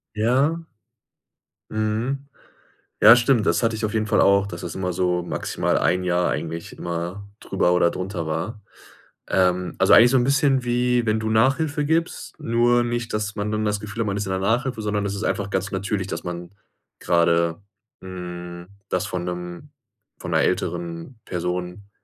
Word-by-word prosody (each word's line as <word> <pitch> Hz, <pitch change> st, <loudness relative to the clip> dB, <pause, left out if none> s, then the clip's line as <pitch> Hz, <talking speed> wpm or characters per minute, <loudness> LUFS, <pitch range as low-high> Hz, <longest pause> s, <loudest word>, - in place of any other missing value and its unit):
Ja. 135 Hz, +10 st, +1 dB, 1.1 s
Mhm. 110 Hz, +6 st, -2 dB, 0.7 s
Ja, 110 Hz, +2 st, +10 dB
stimmt, 120 Hz, -3 st, +2 dB
das -, -, +2 dB
hatte 115 Hz, -1 st, +1 dB
ich 110 Hz, -, -4 dB
auf 110 Hz, +1 st, -2 dB
jeden 110 Hz, -1 st, 0 dB
Fall 105 Hz, -, +2 dB
auch, 100 Hz, 0 st, +4 dB
dass 85 Hz, -3 st, -7 dB
das 85 Hz, -, -5 dB
immer 90 Hz, -1 st, -2 dB
so 90 Hz, 0 st, 0 dB
maximal 85 Hz, -, -1 dB
1 90 Hz, +1 st, +1 dB
Jahr 90 Hz, 0 st, +1 dB
eigentlich 80 Hz, +2 st, -5 dB
immer 85 Hz, +4 st, -5 dB
drüber 90 Hz, -2 st, +1 dB
oder 90 Hz, -1 st, +3 dB
drunter 90 Hz, -3 st, -4 dB
war. 85 Hz, +8 st, -3 dB, 0.7 s
Ähm, 90 Hz, -1 st, +1 dB
also 95 Hz, -, +4 dB
eigentlich 120 Hz, +2 st, +8 dB
so 135 Hz, -, +4 dB
'n 120 Hz, -, +3 dB
bisschen 140 Hz, -1 st, +2 dB
wie, 125 Hz, 0 st, +1 dB
wenn 110 Hz, 0 st, +1 dB
du 110 Hz, -, -2 dB
Nachhilfe 145 Hz, +7 st, +2 dB
gibst, 165 Hz, +2 st, -1 dB
nur 120 Hz, +1 st, +2 dB
nicht, 120 Hz, -1 st, -3 dB
dass 105 Hz, -1 st, -2 dB
man 105 Hz, 0 st, -2 dB
dann 110 Hz, 0 st, -1 dB
das 105 Hz, -1 st, 0 dB
Gefühl 105 Hz, +2 st, -5 dB
hat, 110 Hz, -, -1 dB
man 100 Hz, 0 st, -1 dB
ist 105 Hz, -, -2 dB
in 95 Hz, -, -4 dB
der 95 Hz, -, -1 dB
Nachhilfe, 115 Hz, +4 st, 0 dB
sondern 105 Hz, -1 st, -1 dB
es 100 Hz, 0 st, -2 dB
ist 100 Hz, -, -4 dB
einfach 100 Hz, -2 st, -1 dB
ganz 95 Hz, 0 st, -2 dB
natürlich, 95 Hz, 0 st, -2 dB
dass -, -, -5 dB
man 90 Hz, 0 st, -6 dB, 0.5 s
gerade 85 Hz, +1 st, +2 dB, 0.4 s
hm, 90 Hz, -1 st, -8 dB, 0.2 s
das -, -, 0 dB
von 90 Hz, -4 st, -3 dB
'nem 90 Hz, +7 st, -6 dB, 0.5 s
von -, -, -6 dB
'ner -, -, +3 dB
älteren 85 Hz, +6 st, -2 dB
Person 90 Hz, +2 st, -4 dB
100 Hz, 175 wpm, -23 LUFS, 90-115 Hz, 1.1 s, Ja